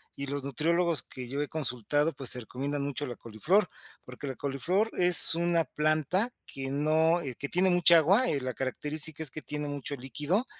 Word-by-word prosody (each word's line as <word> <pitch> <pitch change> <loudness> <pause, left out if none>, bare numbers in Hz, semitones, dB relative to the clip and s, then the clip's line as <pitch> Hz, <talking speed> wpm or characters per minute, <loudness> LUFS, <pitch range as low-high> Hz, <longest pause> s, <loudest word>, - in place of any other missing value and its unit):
y 140 - -7
los 140 0 -5
nutriólogos 165 +4 0
que 125 -2 -10
yo 140 +3 -5
he 145 - -4
consultado, 145 +1 -2
pues, 135 -6 0
te 125 - -4
recomiendan 140 +5 -6
mucho 145 +1 -5
la 125 -3 -8
coliflor, 155 - -2 0.3
porque 125 +3 -11
la 135 - -7
coliflor 165 - -3
es 175 -4 +11
una 170 0 -1
planta 155 - -2
que 135 0 -8
no, 160 +4 0
eh, 130 -6 -8
que 140 - -6
tiene 185 +2 0
mucha 175 -1 +4
agua, 195 - +1
eh, 140 -3 -2
la 130 0 -6
característica 150 +5 -1
es 155 - +1
que 155 - -8
tiene 150 0 -7
mucho 145 0 -5
líquido, 145 - -4
150 Hz, 195 wpm, -26 LUFS, 135-170 Hz, 0.3 s, es